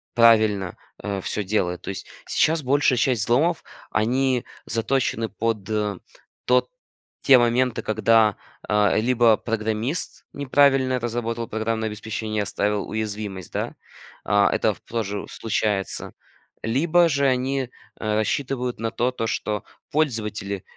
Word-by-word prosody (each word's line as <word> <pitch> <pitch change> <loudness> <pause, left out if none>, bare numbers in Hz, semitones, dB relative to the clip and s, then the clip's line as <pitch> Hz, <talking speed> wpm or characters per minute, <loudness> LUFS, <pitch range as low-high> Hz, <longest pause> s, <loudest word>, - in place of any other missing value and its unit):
правильно, 110 -6 +4 0.2
а, 100 -1 -4
всё 105 - -2
делает. 90 -3 -1
То - - -7
есть 95 - -6 0.2
сейчас 160 +1 +2
большая 135 0 +3
часть 120 -3 +2
взломов- 155 +10 +2 0.3
они 125 +3 +1 0.2
заточены 115 0 0
под 105 0 -2 0.8
тот 125 0 +3 0.5
те 135 - +7
моменты, 120 0 +2
когда, 110 -1 +3 0.3
а, 105 -1 +3
либо 115 0 +4
программист 110 +6 -3
неправильно 135 -2 +3
разработал 115 -1 -3
программное 110 +1 -2
обеспечение, 110 0 -3
оставил 100 +1 -1
уязвимость, 105 -4 -4
да. - - -3 0.5
А, 100 0 +4
это 110 - +2
в - - -18
тоже 105 -3 -3
случается, 105 -3 -2 0.5
либо 165 +9 +3
же 140 -2 +1
они, 130 0 0 0.3
а, 110 -1 -1
рассчитывают 125 +3 -1
на 115 0 -1
то 120 +2 0
то, 115 -3 -3
что 105 -1 -2 0.3
пользователи 105 -9 -1
115 Hz, 120 wpm, -23 LUFS, 105-125 Hz, 0.8 s, те